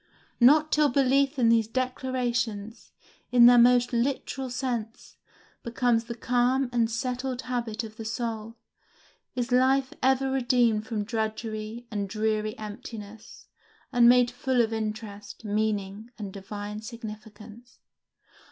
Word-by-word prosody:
Not 300 +5 +5
till 300 -1 +4
belief 275 +2 +2
in 235 -3 +3
these 225 -2 +3
declarations, 245 -3 -3 0.4
in 245 -1 +7
their 245 0 +8
most 245 0 +4
literal 260 +2 -1
sense, 240 -3 -4 0.4
becomes 235 -1 0
the 235 0 -6
calm 245 +2 +1
and 230 -2 +2
settled 250 +2 -3
habit 240 -2 -3
of 220 -1 -10
the 225 - -6
soul, 225 0 -4 0.8
is 250 0 -2
life 260 +1 +3
ever 265 +1 +2
redeemed 240 -4 +2
from 215 -3 -2
drudgery 220 +1 -4
and 200 -2 -3
dreary 215 0 -1
emptiness, 215 0 -9 0.5
and 240 -1 +6
made 245 0 +5
full 255 +1 -1
of 225 -1 +2
interest, 215 -1 -6
meaning, 210 0 -2
and 200 -4 -7
divine 205 +1 -7
significance. 220 0 -10
235 Hz, 125 wpm, -27 LUFS, 215-250 Hz, 0.8 s, their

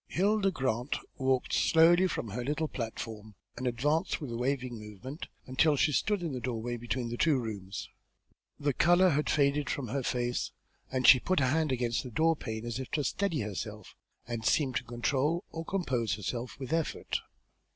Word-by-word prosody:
Hilda 200 +2 +2
Grant 130 -5 -1 0.2
walked 130 -1 +1
slowly 165 +1 +6
down 185 +1 +4
from 115 - -3
her 120 +5 -3
little 150 +4 -1
platform, 110 -4 -6 0.2
and 130 - -3
advanced, 145 +7 +1
with 145 -6 -5
a - - -3
waving 125 -1 -1
movement, 105 - -8 0.2
until 145 +4 +3
she 150 - +3
stood 200 +6 +1
in 165 - -2
the 130 - -3
doorway 120 -1 -3
between 120 +1 -3
the 120 - -4
two 155 -1 +3
rooms. 100 -6 -5 0.7
The 145 -1 +1
colour 175 +6 +5
had 150 +1 +1
all - - +2
faded 145 0 +2
from 130 -5 -2
her 135 +4 -1
face, 120 -1 -1 0.4
and 130 -1 0
she 130 - +10
put 185 +6 +1
a 135 - +3
hand 155 +3 +1
against 120 -2 0
the 125 - -7
door 160 +7 +3
pane 110 -5 -5
as 120 +1 -3
if 130 - -5
to 150 - +1
steady 170 +2 0
herself, 105 0 -6 0.3
and 115 -1 -4
seemed 130 +1 +2
to - - -3
control 135 - 0
or 165 - -5
compose 125 - 0
herself 120 +5 -4
with 135 +3 -4
an 165 - +4
effort. 160 - -3
130 Hz, 195 wpm, -31 LUFS, 120-155 Hz, 0.7 s, she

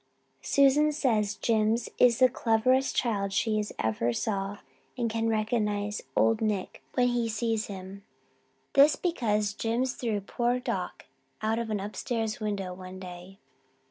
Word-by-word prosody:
Susan 280 +2 +4
says 220 -8 +1
Jims 225 0 +1
is 240 -2 +6
the 255 - +6
cleverest 250 +2 +2
child 200 -5 0
she 215 +1 +1
ever 110 +2 0
saw 195 - -2 0.4
and 235 -2 -1
can 225 0 0
recognize 210 -2 0
Old 225 0 +3
Nick 210 -4 -2
when 245 -1 +3
he 240 -1 0
sees 225 0 -1
him 195 0 -8 0.7
this 285 +2 +6
because 215 - 0
Jims 235 +4 -1
threw 225 -4 -2
poor 240 +5 -1
Doc 250 - -4 0.4
out 220 +1 +1
of 230 -1 -3
an 210 -2 -1
upstairs 220 +2 -3
window 200 -4 -3
one 185 0 -9
day. 180 +1 -10
220 Hz, 140 wpm, -28 LUFS, 205-240 Hz, 0.7 s, is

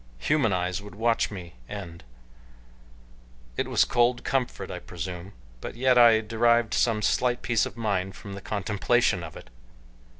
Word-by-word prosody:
Human 125 - +1
eyes 90 +1 -1
would 105 0 -11
watch 115 +2 +1
me 90 -5 -8 0.2
end. 90 -7 -8 1.5
It - - -1
was - - +3
cold 120 0 +2
comfort 130 -2 -2
I - - -5
presume, 90 +2 -7 0.3
but - - -6
yet 130 +1 +3
I 115 -2 +7
derived 115 +1 +2
some 110 -3 +1
slight 120 +2 +1
peace 115 -3 +1
of - - -12
mind 95 -4 -1
from 100 - -9
the 100 - -7
contemplation 105 0 +1
of 80 -1 -8
it. - - -14
105 Hz, 155 wpm, -26 LUFS, 95-120 Hz, 1.5 s, I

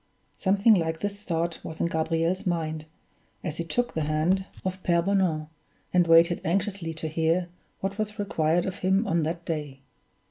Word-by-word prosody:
Something 200 +3 +4
like 160 -4 0
this 205 0 -3
thought 170 -1 -1
was 160 - -7
in - - +2
Gabriel's 165 +2 0
mind, 160 -3 -1 0.6
as 155 - -3
he 170 - -1
took 240 +8 -1
the 160 -2 -1
hand 165 +6 +1 0.2
of 185 0 -3
Pere 170 -2 +2
Bonan, 185 -5 +1 0.5
and 180 -1 +4
waited 165 +1 +5
anxiously 190 -1 -1
to 160 0 -4
hear 165 +3 +1 0.3
what 195 +2 -3
was 215 0 -2
required 175 -4 +1
of 190 - -4
him 190 +4 +2
on 170 -4 +1
that 165 +2 -3
day. 150 -4 -4
170 Hz, 170 wpm, -27 LUFS, 160-190 Hz, 0.6 s, waited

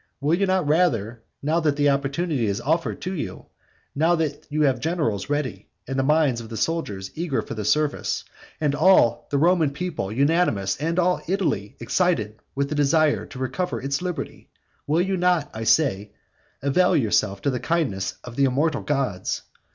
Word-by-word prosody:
will 145 +3 +1
you 195 +3 +2
not 185 -4 +1
rather, 120 - +1 0.2
now 155 +4 +2
that 150 -3 +1
the 145 0 +2
opportunity 140 -1 0
is 100 0 -1
offered 165 +3 0
to 185 - -4
you, 110 - -5 0.5
now 165 +4 +3
that 155 -3 -3
you 155 +1 +1
have 135 -3 +2
generals 150 - -1
ready, 130 -10 -2 0.2
and 135 +1 -2
the - - +4
minds 145 -4 +2
of 110 - -10
the 115 - -6
soldiers 105 -14 -2
eager 160 -4 -1
for - - -7
the 110 -2 -4
service, 150 +7 0 0.4
and 150 -3 +1
all 145 -7 +4
the 140 - 0
Roman 165 0 +3
people 150 - -4
unanimous, 135 - +1
and 165 +4 -2
all 180 0 +2
Italy 170 - -1
excited 115 - 0 0.2
with 140 0 0
the - - -2
desire 150 +1 +2
to 145 - -11
recover 130 +8 -2
its 140 +3 -2
liberty, 180 -2 -5 0.4
will 155 +4 +2
you 190 +1 0
not, 180 -4 +1
I 110 0 -5
say, 105 -9 +2 0.5
avail 140 +6 +3
yourself 100 -5 +1
of 140 - +3
the 125 - -2
kindness 140 - -1
of 125 -1 -9
the 140 - +3
immortal 140 +3 +1
gods? 135 -11 -2
145 Hz, 180 wpm, -24 LUFS, 120-165 Hz, 0.5 s, the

